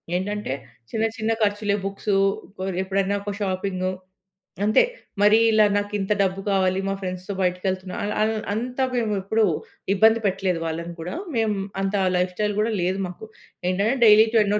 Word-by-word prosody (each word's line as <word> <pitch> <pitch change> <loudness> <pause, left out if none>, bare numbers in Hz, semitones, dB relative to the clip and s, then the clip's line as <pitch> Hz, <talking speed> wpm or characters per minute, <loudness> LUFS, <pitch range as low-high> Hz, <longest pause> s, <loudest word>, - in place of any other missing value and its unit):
ఏంటంటే 205 -4 -2 0.4
చిన్న 225 0 0
చిన్న 220 0 0
ఖర్చులే 205 -1 +1
బుక్స్ 200 +1 -3 0.7
ఎప్పుడైనా 195 +1 0
ఒక 205 - -4
షాపింగు 185 -1 -1 0.7
అంతే. 215 - +5 0.4
మరీ 210 +2 +6
ఇలా 215 -1 +5
నాకు 205 0 -2
ఇంత 195 +2 -3
డబ్బు 190 0 0
కావాలి 190 -1 +2
మా - - 0
ఫ్రెండ్స్‌తో 185 +1 -4
బయటకెళ్తున్నా, 185 0 -1
అల్ 205 +1 -1
అల్ 220 +1 +2 0.2
అంత 245 +4 -4 0.2
మేము 225 -3 0
ఎప్పుడు 220 +3 +2 0.5
ఇబ్బంది 220 +3 +5
పెట్టలేదు 190 -3 0
వాళ్ళని 170 +1 -4
కూడా. 175 - -5 0.2
మేము 220 -2 +1 0.3
అంత 195 +1 -1 0.2
లైఫ్‌స్టైల్ 185 +4 0
గూడా 220 +2 +1
లేదు 185 +2 0
మాకు. 180 +5 -9 0.4
ఏంటంటే 205 +7 +1
డైలీ 215 0 +8
టెన్నో 210 -1 +3
200 Hz, 150 wpm, -24 LUFS, 185-215 Hz, 0.7 s, డైలీ